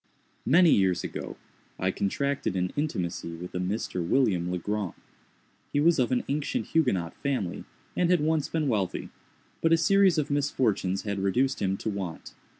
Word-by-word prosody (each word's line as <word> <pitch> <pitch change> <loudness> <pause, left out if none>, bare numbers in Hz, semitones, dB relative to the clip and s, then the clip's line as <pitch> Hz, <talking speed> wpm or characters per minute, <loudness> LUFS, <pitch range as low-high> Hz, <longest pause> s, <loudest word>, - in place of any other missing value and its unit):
_ - - -64 0.5
Many 170 +1 +7
years 95 -3 +3
ago, - - -6 0.4
I 95 0 0
contracted 140 +5 -1
an 90 0 -1
intimacy 90 - -2
with 90 +2 -8
a 90 - -2
Mr. 90 -1 -2
William 90 -4 +2
Legrand. 95 +2 -2 0.8
He 145 - +1
was 165 +1 +4
of 125 -1 +2
an 125 - +1
ancient 145 +1 -2
Huguenot 100 - +1
family, 130 -11 -2 0.3
and 175 - +2
had 180 -1 +4
once 155 0 +1
been 160 -3 0
wealthy; 100 -7 -1 0.5
but 165 - +2
a 165 - +6
series 195 0 +4
of 150 -2 0
misfortunes 120 -9 0
had 100 -2 -2
reduced 125 +8 +1
him 95 0 0
to 110 - -3
want. 95 -5 -6
110 Hz, 165 wpm, -27 LUFS, 95-150 Hz, 0.8 s, Many